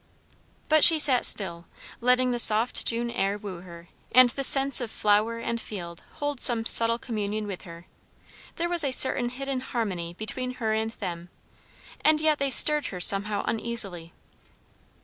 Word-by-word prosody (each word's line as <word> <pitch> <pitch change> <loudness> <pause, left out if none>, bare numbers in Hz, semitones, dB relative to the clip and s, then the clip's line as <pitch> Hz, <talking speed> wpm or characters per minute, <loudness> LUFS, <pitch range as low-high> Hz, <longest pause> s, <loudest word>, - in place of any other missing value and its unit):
But 310 -1 +1
she 325 - +9
sat 275 -5 +2
still, 170 -4 +1 0.3
letting 250 +1 -1
the 240 - -4
soft 225 +2 +1
June 235 +1 -4
air 200 -2 -4
woo 200 -4 -11
her, 170 -1 -15 0.3
and 255 +1 +5
the 275 - -7
scents 270 -1 +3
of 240 - -6
flower 215 +2 -2
and 230 0 -6
field 170 -5 -10
hold 290 -3 -7
some 230 -2 +3
subtle 230 0 +7
communion 215 -3 -7
with 195 -3 -10
her. 170 0 -14 0.7
There 340 - -4
was 345 -2 +1
a 275 - -3
certain 255 -1 +3
hidden 270 +1 -7
harmony 190 -9 -7
between 250 +5 -6
her 220 -3 -4
and 220 0 -4
them; 175 -5 -10 0.7
and 310 0 +2
yet 310 -1 -1
they 275 0 -3
stirred 300 +3 +3
her 180 - -9
somehow 200 +3 +1
uneasily. 200 -8 -5
230 Hz, 165 wpm, -23 LUFS, 200-255 Hz, 0.7 s, she